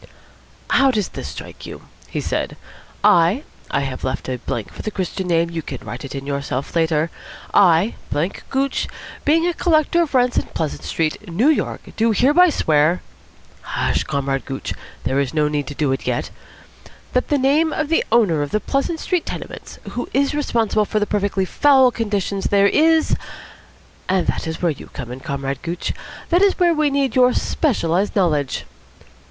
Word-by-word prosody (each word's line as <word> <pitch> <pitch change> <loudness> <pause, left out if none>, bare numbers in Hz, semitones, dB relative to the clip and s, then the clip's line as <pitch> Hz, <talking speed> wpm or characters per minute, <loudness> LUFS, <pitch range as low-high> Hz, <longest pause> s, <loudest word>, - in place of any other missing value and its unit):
"How 270 - +5
does 210 -7 0
this - - -6
strike - - -9
you?" - - -9 0.2
he - - -3
said. - - -2 0.5
"'I' 205 - +4 0.3
(I 140 - 0
have 135 -2 -4
left 130 0 -3
a 125 -1 -3
blank 115 -3 -4
for - - -7
the - - -3
Christian 190 -2 -3
name: 170 -1 +2
you 165 -1 -3
can 140 -3 -6
write 120 +4 -6
it 135 0 -7
in 135 0 -5
yourself 140 0 -3
later) 160 -1 +1 0.4
'I, 185 +2 +5 0.2
blank 155 +6 -1
Gooch, 270 0 0 0.4
being 325 +3 +4
a 350 - +1
collector 335 0 +2
of 310 -5 -1
rents 250 -1 +3
in - - +2
Pleasant 155 -3 -2
Street, 165 +5 -2
New 215 - +3
York, 315 - 0 0.2
do 225 +1 +3
hereby 295 - +5
swear' 155 - +2 0.6
hush, - - -1
Comrade 135 -1 -1
Gooch, 135 -1 -4 0.3
there 135 - 0
is 140 +1 -1
no 150 -1 +3
need 150 -1 -2
to 145 - -6
do 145 -2 +1
it 135 - -3
yet - - -1 0.8
'that 250 - +1
the 290 - +2
name 290 +4 +3
of 305 -1 -2
the 325 - +3
owner 205 -10 +4
of 145 - -2
the 215 - 0
Pleasant 280 +8 -1
Street 360 0 -1
tenements, - - -7
who 245 - -4
is 275 +1 +2
responsible 230 -7 +1
for 215 - 0
the 210 - +1
perfectly 200 -2 0
foul 265 +3 +5
conditions 205 -4 -2
there, 200 0 +4
is 320 +4 +4 0.5
' - - -28
And 185 -1 +2
that - - -1
is 160 +2 -5
where 170 - +3
you 145 - -9
come 120 -3 -6
in, 125 - -6
Comrade 135 -2 -4
Gooch. 175 +1 -3 0.4
That 350 +2 +4
is 400 -1 +4
where 350 -2 +4
we 305 -2 +2
need 275 -3 0
your 250 -1 +5
specialised 195 - 0
knowledge. 155 -8 +1
195 Hz, 185 wpm, -20 LUFS, -, 0.8 s, How